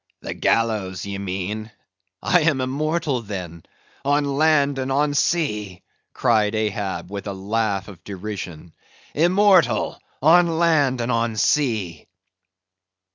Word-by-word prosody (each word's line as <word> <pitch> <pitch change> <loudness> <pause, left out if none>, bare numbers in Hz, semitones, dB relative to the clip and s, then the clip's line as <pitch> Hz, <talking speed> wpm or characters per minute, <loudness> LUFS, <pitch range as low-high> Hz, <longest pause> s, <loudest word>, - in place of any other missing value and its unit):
"The - - -5
gallows, 105 -6 0
ye 100 -1 -5
mean.—I 95 - -3
am 155 -4 +2
immortal 145 +1 -1
then, 90 -6 -7 0.4
on 145 +1 +2
land 140 -1 +2
and 130 0 -2
on 145 +2 +1
sea," 105 - -1 0.3
cried 110 -4 +1
Ahab, 100 -4 -3
with 100 0 -6
a 100 - -3
laugh 100 0 -2
of 95 -5 -13
derision;—"Immortal 105 - 0 0.2
on 165 +2 +4
land 145 -7 +2
and 120 +1 -1
on 115 -1 0
sea!" 110 - 0
115 Hz, 110 wpm, -22 LUFS, 100-145 Hz, 0.4 s, on